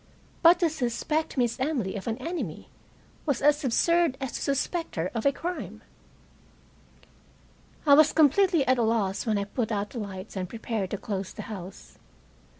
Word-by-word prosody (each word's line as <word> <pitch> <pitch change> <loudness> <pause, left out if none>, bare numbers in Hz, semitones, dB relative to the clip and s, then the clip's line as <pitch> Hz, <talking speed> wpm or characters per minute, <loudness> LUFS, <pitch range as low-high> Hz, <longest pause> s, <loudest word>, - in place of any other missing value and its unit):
But 340 +1 +7
to 340 - +4
suspect 300 +3 -2
Miss 240 -1 +1
Emily 255 -9 -1
of 195 - -6
an 225 0 -1
enemy 260 - -5 0.6
was 280 -5 +1
as 295 +2 +3
absurd 330 +3 +2
as 265 -2 -4
to - - -5
suspect 320 +5 -1
her 170 +1 -2
of 230 +2 0
a - - +5
crime. 350 +5 -6 2.0
I 285 - +7
was 305 +1 +7
completely 320 +1 +4
at 255 -1 +3
a - - +3
loss 220 -2 0
when 215 -2 +2
I 200 - 0
put 220 +2 -3
out 205 -1 -2
the 240 - -5
lights 200 -1 -7
and 185 -2 -3
prepared 220 -3 -3
to 205 - -3
close 195 -3 -4
the - - -7
house. 185 -1 -10
245 Hz, 170 wpm, -27 LUFS, 205-300 Hz, 2.0 s, But